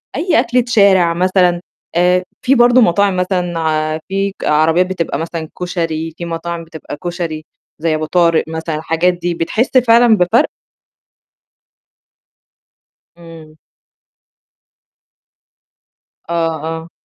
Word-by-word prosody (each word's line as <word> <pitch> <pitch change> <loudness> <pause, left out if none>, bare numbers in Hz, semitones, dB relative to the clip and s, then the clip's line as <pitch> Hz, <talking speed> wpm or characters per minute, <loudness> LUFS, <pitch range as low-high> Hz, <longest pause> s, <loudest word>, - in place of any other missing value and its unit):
أي 355 0 +1
أكلة 245 +1 +1
شارع 195 -7 +4
مثلًا، 180 0 +2 0.3
آآ 180 +1 +3 0.2
في 260 +2 +3
برضه 245 0 +5
مطاعم 200 0 +2
مثلًا، 165 -4 -1
في 195 +1 -1
ك - - -7
عربيات 160 +4 +3
بتبقى 175 -6 -3
مثلًا 165 -1 -5
كشري، 165 -3 -3
في 170 - -5
مطاعم 170 0 -5
بتبقى 160 -2 -9
كشري 170 -3 -4 0.3
زي 160 -1 0
أبو 155 0 -2
طارق 170 0 +2
مثلًا 160 0 -4
الحاجات 165 +3 0
دي 175 0 -3
بتحس 220 +11 0
فعلًا 235 -2 +5
بفرق؟ 180 +6 +2 2.7
إمم. 165 -2 -14 2.7
آه، - - -2 0.3
آه. 165 +1 -5
175 Hz, 110 wpm, -16 LUFS, 160-190 Hz, 2.7 s, برضه